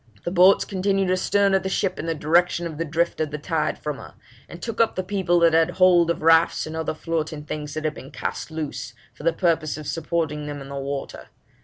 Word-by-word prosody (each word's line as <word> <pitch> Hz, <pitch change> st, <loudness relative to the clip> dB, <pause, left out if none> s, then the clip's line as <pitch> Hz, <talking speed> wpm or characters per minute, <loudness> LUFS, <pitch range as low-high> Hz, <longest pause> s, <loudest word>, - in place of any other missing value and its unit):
The 175 Hz, -, -3 dB
boats 185 Hz, +2 st, +5 dB
continued 195 Hz, -1 st, 0 dB
astern 200 Hz, +2 st, +2 dB
of 195 Hz, -, +3 dB
the 190 Hz, -, -3 dB
ship 190 Hz, -1 st, -1 dB
in 165 Hz, -, -4 dB
the 165 Hz, -, -1 dB
direction 170 Hz, +3 st, +2 dB
of 160 Hz, -2 st, -6 dB
the 165 Hz, -, -1 dB
drift 165 Hz, +2 st, -1 dB
of 155 Hz, -, 0 dB
the 150 Hz, -, -4 dB
tide 160 Hz, +1 st, -1 dB
from 150 Hz, -2 st, -4 dB
her, -, -, -12 dB, 0.3 s
and 170 Hz, -, -9 dB
took 230 Hz, +3 st, -2 dB
up 230 Hz, -, +2 dB
the 185 Hz, -, -2 dB
people 185 Hz, -2 st, +1 dB
that 165 Hz, -1 st, +5 dB
had 165 Hz, +1 st, +4 dB
hold 180 Hz, -2 st, +4 dB
of 170 Hz, -2 st, -1 dB
rafts 165 Hz, +1 st, +4 dB
and 155 Hz, -, -6 dB
other 160 Hz, -1 st, -2 dB
floating 155 Hz, -2 st, -3 dB
things 150 Hz, 0 st, -6 dB
that 155 Hz, -, -3 dB
had 155 Hz, -2 st, -1 dB
been 135 Hz, -, -11 dB
cast 140 Hz, -, -5 dB
loose, 160 Hz, -2 st, -5 dB, 0.2 s
for -, -, -14 dB
the 165 Hz, +2 st, +2 dB
purpose 165 Hz, -3 st, 0 dB
of 155 Hz, -, -8 dB
supporting 155 Hz, -2 st, -2 dB
them 145 Hz, -1 st, -5 dB
on 135 Hz, 0 st, -9 dB
the 140 Hz, -, -6 dB
water. 140 Hz, 0 st, -5 dB
165 Hz, 235 wpm, -23 LUFS, 155-180 Hz, 0.3 s, boats